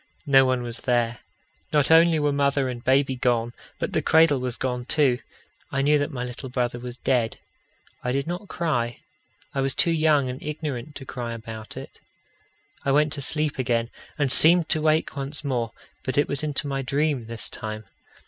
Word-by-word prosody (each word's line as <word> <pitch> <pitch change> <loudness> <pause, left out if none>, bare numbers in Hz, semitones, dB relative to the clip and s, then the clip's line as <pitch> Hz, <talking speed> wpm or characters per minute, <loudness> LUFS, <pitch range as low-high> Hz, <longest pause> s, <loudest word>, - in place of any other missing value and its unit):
No 135 -2 +6
one 130 -1 0
was 120 -1 -5
there. 120 -2 0 0.5
Not 150 0 +2
only 165 0 +6
were 150 -1 +1
mother 140 -1 +1
and 120 -1 -6
baby 135 0 +2
gone, 120 -2 0 0.2
but - - -3
the - - +1
cradle 160 -3 +4
was 125 -1 -3
gone 125 -1 -2
too. 130 -2 +2 0.5
I 135 0 0
knew 150 +1 +4
that 145 - -1
my 125 -2 -4
little 125 +2 -7
brother 120 -1 -1
was 125 0 -7
dead. 125 -4 0 0.7
I 125 - -1
did 140 +1 -1
not 175 +4 -5
cry: 120 -11 -2 0.5
I 135 - 0
was 135 -1 0
too 170 - +4
young 155 -4 +3
and 125 +1 -6
ignorant 150 -2 -5
to 135 - -8
cry 120 -2 -5
about 110 -1 -8
it. - - -10 0.8
I 140 - +1
went 150 +1 +3
to 145 - -3
sleep 150 0 0
again, 120 -2 0 0.3
and 145 -3 +1
seemed 165 +2 +7
to 155 - +2
wake 155 0 +1
once 140 +3 -4
more; 120 -5 -1 0.3
but 130 0 -3
it 145 - +3
was 140 +1 -1
into 150 -1 -1
my 135 -1 -2
dream 140 -2 -1
this 115 -1 -5
time. 110 0 -6
135 Hz, 190 wpm, -24 LUFS, 125-150 Hz, 0.8 s, seemed